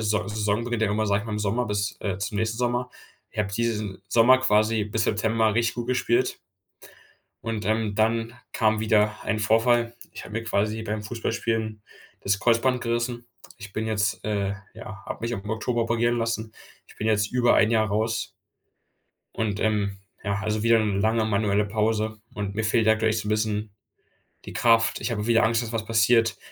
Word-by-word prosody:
Saison 105 +1 0
beginnt 120 -2 -2
normalerweise, 105 0 +1
ja, - - +3
sage - - -3
ich - - -10
mal, 110 - -4
im 105 - -2
Sommer 110 +4 0
bis, 105 -1 -2
äh, 95 -3 -2
zum 100 +1 -3
nächsten 115 +2 -1
Sommer. 125 0 -1 0.4
Ich - - -13
habe 100 -1 0
diesen 105 -4 -2
Sommer 125 +3 +6
quasi 110 -2 +2
bis 110 +2 -1
September 110 0 +1
richtig 115 0 +1
gut 120 -1 -3
gespielt 125 0 +1 1.1
und, 110 -2 -3
ähm, 110 -1 0
dann 115 +2 +1 0.2
kam 110 -1 +2
wieder 105 -1 +2
ein 110 -1 -1
Vorfall. 115 +2 +2 0.2
Ich - - -9
habe - - -11
mir 115 +2 -2
quasi 110 0 0
beim 105 -1 -3
Fußballspielen 115 -1 -2 0.4
das 100 0 0
Kreuzband 120 +1 +2
gerissen. 120 0 -2 0.3
Ich 100 -2 -10
bin 110 +2 -2
jetzt 105 -2 -1
äh, 100 -2 -1 0.2
ja, 110 -1 -10
habe - - -6
mich 120 - -1
auch 100 -3 -7
im 105 - -5
Oktober 115 +2 0
operieren 120 +1 +1
lassen. 115 -1 -2 0.3
Ich - - -18
bin 110 - -3
jetzt 105 -1 +2
über 125 -1 +3
ein 110 - +4
Jahr 110 -2 +3
raus. 110 +2 -1 1.0
Und 105 -2 -2
ähm, 100 -2 0 0.3
ja, 100 -1 0
also 110 0 -1
wieder 115 0 +5
eine 105 -2 0
lange 110 +2 +2
manuelle 105 -1 +1
Pause 110 +1 -1
und 100 -1 -4
mir 110 +1 -1
fehlt 110 0 +2
aktuell 110 0 +3
echt 110 0 0
so 105 - -6
'n - - -1
bisschen 105 0 -1 0.8
die - - -8
Kraft 115 -1 +3
ich - - -2
habe 105 -1 -2
wieder 115 0 +4
Angst, 115 +1 +2
dass 115 - -6
was 110 -1 -2
passiert, 115 -1 +3
110 Hz, 190 wpm, -25 LUFS, 105-115 Hz, 1.1 s, Sommer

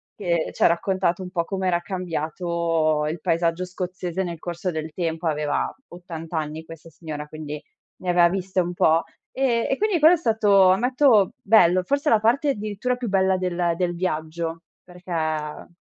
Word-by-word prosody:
che 170 -5 -1
c'ha - - +4
raccontato 185 +1 0
un 180 - -8
po' 170 -2 0
com'era 185 -1 -1
cambiato 165 -3 -1
il 165 - -4
paesaggio 170 +2 0
scozzese 180 0 -4
nel 170 -2 -5
corso 175 +2 -4
del 155 -2 -4
tempo. 165 -1 -3
Aveva 150 -1 -1
80 165 -2 -7
anni 155 +1 -4
questa 165 0 -12
signora, 155 -2 -7
quindi 150 -1 -7 0.4
ne 180 - -5
aveva 175 -1 +5
viste 190 0 -2
un 175 0 -3
po'. 165 -1 +3 0.3
Ehm, 245 -3 +1
e - - +2
quindi 420 -5 +1
quello 315 +3 +7
è 355 - +3
stato, 210 - +4
ammetto 240 0 +4
bello, 185 -4 +5
forse 280 - 0
la 220 - +5
parte 240 +7 +2
addirittura 215 +1 -2
più 245 -3 -4
bella 190 -1 +2
del 175 -2 0
del 175 0 -1
viaggio, 165 -1 -3 0.2
perché, 180 0 -13
ehm 155 0 -3
175 Hz, 165 wpm, -23 LUFS, 165-195 Hz, 0.4 s, quello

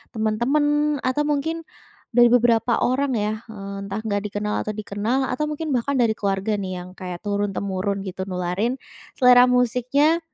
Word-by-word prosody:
teman-teman, 290 +7 +1
atau 255 +3 +1
mungkin 320 +3 -1 0.5
dari 240 0 +6
beberapa 235 -1 +3
orang 260 +1 +1
ya, 215 0 -1
eee, 200 -2 -7
entah 200 +2 -4
enggak 205 -2 0
dikenal 210 +1 -3
atau 215 - -1
dikenal, 215 +5 -1
atau 255 +4 -1
mungkin 305 +1 -4
bahkan 265 +4 0
dari 240 -4 +3
keluarga 200 0 -1
nih 185 -2 -4
yang 180 - -11
kayak 180 -2 -7
turun-temurun 200 -1 -2
gitu 190 -1 -5
nularin 185 +6 -1 0.4
selera 250 -1 +7
musiknya, 250 +6 +2
225 Hz, 150 wpm, -23 LUFS, 200-255 Hz, 0.5 s, selera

